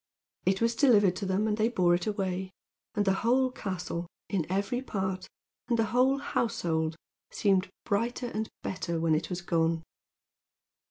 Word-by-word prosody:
It 195 +2 +2
was 230 0 +3
delivered 210 -8 +5
to 200 - -3
them, 195 +3 +1
and 210 -1 0
they 220 +1 +3
bore 180 -7 +3
it 175 +2 0
away; 190 -3 -1 0.5
and 205 -1 +2
the 195 - +4
whole 255 +2 +3
castle, 180 -6 -4 0.2
in 180 -4 -1
every 200 +6 0
part, 190 -6 -3 0.4
and 240 -1 +2
the 225 - +3
whole 260 +2 +4
household, 170 - -1 0.3
seemed 195 -3 +2 0.2
brighter 235 +4 0
and 220 +1 -2
better 175 -3 -2
when 165 -1 +2
it 155 +1 0
was 180 0 -3
gone. 165 -2 +1
195 Hz, 160 wpm, -29 LUFS, 175-230 Hz, 0.5 s, delivered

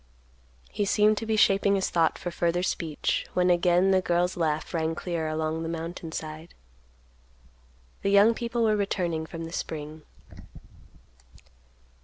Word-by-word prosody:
He 205 - -1
seemed 210 +1 +3
to 225 - -6
be 220 - +1
shaping 200 -1 +4
his 190 - -1
thought 165 -2 +2
for 175 - -5
further 170 +1 0
speech, 160 -4 -2
when 180 0 +3
again 175 +2 +3
the 190 -1 +3
girl's 175 0 0
laugh 155 -3 -1
rang 160 -1 -1
clear 170 -2 -3
along 155 +1 -2
the 165 - -4
mountain 165 0 -5
side. 155 +1 -7 1.5
The 200 - 0
young 200 +3 +6
people 235 0 -2
were 215 -1 +3
returning 175 -6 -1
from 165 0 -7
the 165 +1 -8
spring. 155 -1 -5
175 Hz, 145 wpm, -27 LUFS, 160-195 Hz, 1.5 s, young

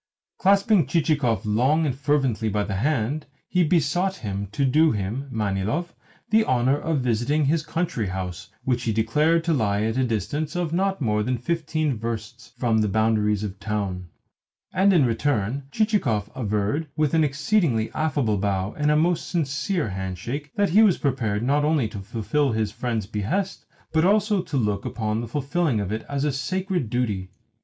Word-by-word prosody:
Clasping 195 - +4
Chichikov 140 - +1
long 130 +10 +2
and 135 -4 -1
fervently 135 -6 +1
by 105 0 0
the 100 -2 -3
hand, 140 +4 -1 0.2
he 180 -1 +2
besought 175 +4 +1
him 100 0 -3
to 140 +6 0
do 155 +4 +4
him, 110 +7 -3
Manilov, 110 - -1 0.4
the 220 0 +5
honour 130 - +2
of 155 -4 -1
visiting 125 +5 +1
his 155 +3 +2
country 155 - -2
house 90 0 -5
(which 125 -2 0
he 115 - +1
declared 150 +10 +2
to 165 0 +1
lie 105 -6 +1
at 110 +2 -1
a - - +3
distance 145 - -2
of 175 -3 -1
not 195 0 0
more 105 -4 +1
than 125 +4 0
fifteen 155 +1 -1
versts 115 0 -6
from 115 -3 +2
the 105 - +2
boundaries 105 0 +1
of 100 -1 -5
the - - -16
town); 100 -4 -3 0.7
and 190 +2 +4
in 165 -8 +4
return 120 +1 0
Chichikov 195 - 0
averred 110 +6 -1
(with 155 -1 +1
an 160 -1 +4
exceedingly 140 - +1
affable 140 -9 0
bow 95 0 -1
and 150 0 +1
a 150 - +4
most 170 +3 +1
sincere 165 - -1
handshake) 95 - -4
that 205 -4 +1
he 210 +5 +6
was 210 -5 +5
prepared 115 -6 -1
not 145 +4 +2
only 150 -6 +2
to 105 - -7
fulfil 115 +7 -1
his 110 -2 0
friend's 115 -2 -2
behest, 115 - -2 0.3
but 160 0 +3
also 205 +1 +3
to 150 -5 -4
look 105 -5 0
upon 110 -1 -2
the 120 - -5
fulfilling 145 0 0
of 100 -1 -3
it 110 +1 -3
as 140 -1 -1
a 150 - +1
sacred 185 - -2
duty. 105 -6 -1
130 Hz, 175 wpm, -24 LUFS, 110-155 Hz, 0.7 s, he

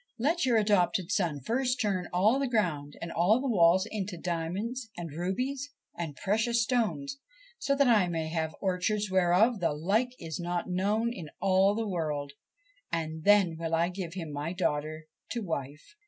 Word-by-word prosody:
Let 290 +5 +1
your 235 -2 +4
adopted 190 -3 +2
son 165 -9 0
first 250 - 0
turn 195 -4 0
all 210 +9 +3
the 275 - 0
ground 165 - -1
and 170 - -5
the - - -8 0.3
walls 190 -6 +4
into 205 -4 -4
diamonds 185 +9 -3
and 170 -3 -5
rubies 250 - -2 0.3
and 160 -4 -5
precious 225 - +1
stones, 260 +4 -1 0.4
so 280 - +1
that 280 -1 +4
I 215 -6 +5
may 165 -2 -2
have 160 -1 -2
orchards 195 +2 0
whereof 190 +5 +3
the 165 -4 +1
like 210 +11 0
is 160 0 -6
not 175 0 -2
known 205 +6 0
in 165 -9 -8
all 195 +1 +3
the 225 0 -2
world, 150 -6 -2 0.6
and 160 -1 -3
then 200 -5 +5
will 165 0 -1
I 170 +1 +2
give 180 -2 -6
him 165 -5 -5
my 145 +4 -3
daughter 155 -3 -2 0.3
to 235 -2 -3
wife.' 150 - -5
185 Hz, 170 wpm, -29 LUFS, 165-225 Hz, 0.6 s, I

